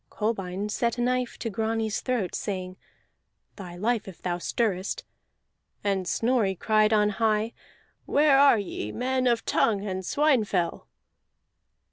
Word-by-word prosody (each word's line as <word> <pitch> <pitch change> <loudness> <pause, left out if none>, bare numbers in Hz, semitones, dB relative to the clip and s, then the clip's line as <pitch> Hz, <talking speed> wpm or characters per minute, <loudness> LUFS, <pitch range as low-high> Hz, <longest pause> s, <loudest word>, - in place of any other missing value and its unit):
Kolbein 200 -3 -2
set 235 +2 0
a - - -1
knife 250 0 0
to 230 - -4
Grani's 220 +1 -1
throat, 245 -8 -1
saying: 185 -3 -4 0.8
"Thy 180 -4 -9
life 220 +4 -1
if 190 - -10
thou 175 -1 -2
stirrest." 195 -1 -1 0.8
And 195 -3 0
Snorri 225 -4 +1
cried 215 +3 +2
on 210 -1 +4
high: 215 +1 0 0.5
"Where 290 -1 +4
are 280 -4 +6
ye, 180 - -4
men 255 +1 0
of 235 -2 +1
Tongue 205 -3 +1
and 190 -2 -3
Swinefell?" 215 - +1
215 Hz, 130 wpm, -26 LUFS, 190-240 Hz, 0.8 s, are